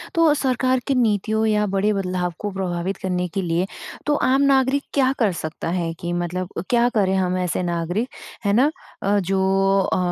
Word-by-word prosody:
तो 330 -3 +5
सरकार 260 -2 +1
की 275 - +2
नीतियों 220 -1 +1
या 210 -1 +2
बड़े 195 +2 +1
बदलाव 180 -2 -2
को 205 -1 -3
प्रभावित 185 0 -3
करने 180 -1 -2
के 195 +3 -3
लिए 175 +1 0 0.4
तो 295 0 +2
आम 270 +1 +3
नागरिक 275 0 +3
क्या 265 -2 +3
कर 215 -5 +3
सकता 155 +1 -4
है 170 -2 -1
कि 175 0 -3
मतलब 175 +1 -2
अ, - - -1
क्या 240 0 +4
करें 190 -2 +2
हम 185 -1 +1
ऐसे 180 0 -1
नागरिक? 175 +6 -1 0.4
है 200 - +3
ना? 270 +7 +4 0.3
अ, 200 +1 +2
जो 190 0 0 0.5
अ, - - +2
195 Hz, 190 wpm, -22 LUFS, 180-245 Hz, 0.5 s, तो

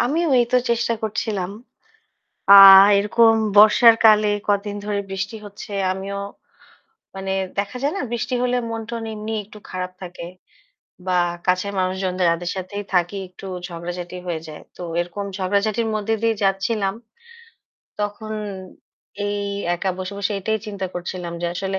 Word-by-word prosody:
আমিও 315 +8 +1
ওইতো 240 0 +3
চেষ্টা 235 0 +1
করছিলাম। 210 -3 -2 1.0
আ - - +11 0.4
এরকম 225 +2 +4 0.2
বর্ষার 215 +2 +8
কালে 215 -1 +6 0.2
কদিন 205 0 0
ধরে 205 -1 -1
বৃষ্টি 195 +3 -4
হচ্ছে। 205 +1 -10 0.2
আমিও 195 +1 -5 1.0
মানে 195 0 -4 0.3
দেখা 200 +4 -2
যায় 285 +2 +1
না, - - -2
বৃষ্টি 240 +1 -2
হলে 250 0 +1
মন-টন 230 +1 -5
এমনি 215 +1 -5
একটু 210 +1 -14
খারাপ 185 0 -4
থাকে 175 -1 -8 0.8
বা 185 -1 0 0.3
কাছের 185 +2 +1
মানুষ 185 0 0
জনদের 185 -1 0
যাদের 170 +1 -2
সাথেই 190 +2 -5
থাকি 180 +2 +1
একটু 180 +2 -13 0.2
ঝগড়াঝাটি 175 +1 -6
হয়ে 170 -2 -2
যায়। 155 -1 -10
তো - - -11 0.2
এরকম 175 +4 -4
ঝগড়াঝাটির 205 +4 0
মধ্যে 215 +1 0
দিয়ে 225 -1 +2
যাচ্ছিলাম। 195 +1 0 1.1
তখন 210 +1 -4 0.9
এই 205 0 -2 0.4
একা 190 +2 -2
বসে, 185 +1 -5
বসে 200 +1 -1
এটাই 220 +3 -1
চিন্তা 200 -2 -4
করছিলাম, 175 0 -5
যে - - 0
আসলে 190 +1 -2
200 Hz, 140 wpm, -21 LUFS, 185-220 Hz, 1.1 s, আ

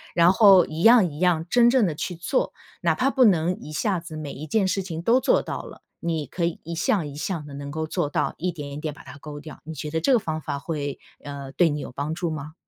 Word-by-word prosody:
然 170 +1 +6
后 195 -2 +7
一 160 +2 -5
样 225 -8 +6
一 145 - -9
样 175 -3 +2
真 240 -1 +5
正 245 -4 +4
地 165 - -1
去 180 +4 -4
做。 175 - -1 0.3
哪 - - +1
怕 265 +2 +2
不 260 -2 +4
能 180 -3 +2
一 155 - -9
下 190 0 0
子 165 -1 -9
每 155 -2 -5
一 155 +3 -8
件 205 +5 +2
事 195 - 0
情 170 -4 -5
都 230 +8 +4
做 - - +3
到 - - -5
了， - - -12 0.2
你 165 -3 -2
可 170 +5 -2
以 170 - -2
一 170 - -6
项 175 +1 +1
一 140 - -9
项 155 0 -3
地 145 - -10
能 140 0 -6
够 160 +1 -3
做 150 - -1
到， - - -1
一 180 +3 -1
点 145 -4 -7
一 140 - -6
点 150 0 -4
把 - - -14
它 - - -11
勾 145 0 -9
掉。 155 -1 -11
你 160 - -6
觉 150 +1 -5
得 160 - 0
这 260 - +3
个 245 - +5
方 160 -5 -3
法 145 - -4
会， 145 -3 -4 0.2
呃， 140 -2 -7
对 165 +5 +3
你 150 0 -2
有 - - -7
帮 145 +4 -3
助 170 0 -2
吗？ 155 -1 -6
160 Hz, 295 characters per minute, -24 LUFS, 150-185 Hz, 0.3 s, 后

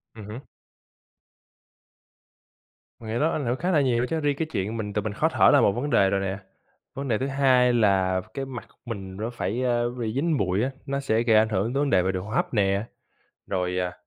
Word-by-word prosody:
Ừm 110 -2 -9
hứm. 110 +6 -8 2.6
Mình 110 - -9
nghĩ 120 - -1
đó 160 +4 +2
ảnh 145 - -2
hưởng 120 +1 0
khá 175 +8 -1
là 155 -5 +4
nhiều 125 -4 +1
đó 120 - +1
chứ. 165 - -1
Riêng 145 -2 0
cái 160 - -1
chuyện 105 +1 -2
mình 105 -2 -4
tự 105 - 0
mình 105 0 -4
khó - - +1
thở - - +4
là - - +6
một - - +4
vấn 125 +8 -3
đề 95 -8 +4
rồi 95 0 0
nè. 95 0 -2 0.6
Vấn 140 +1 -5
đề 115 -4 +1
thứ 130 - -2
2 130 -3 +3
là 95 -5 +2
cái 135 -1 -4
mặt 130 -3 -8
của - - -29
mình 95 -5 -6
nó 110 +3 -3
phải, 120 0 -3
a, 120 -1 +1 0.2
bị 110 -2 -2
dính 155 +4 +1
bụi 95 0 0
á, 130 - -1
nó 140 -1 -2
sẽ 115 -4 +1
gây 115 -2 +4
ảnh 110 +1 +4
hưởng 110 +3 -1
tới 135 - 0
vấn 145 - +1
đề 95 - +4
về 95 +1 0
đường 95 -1 -4
hô - - -9
hấp - - -1
nè, 100 -1 +1 0.6
rồi, 90 -1 -1
à 90 -1 -1
115 Hz, 245 wpm, -25 LUFS, 100-135 Hz, 2.6 s, là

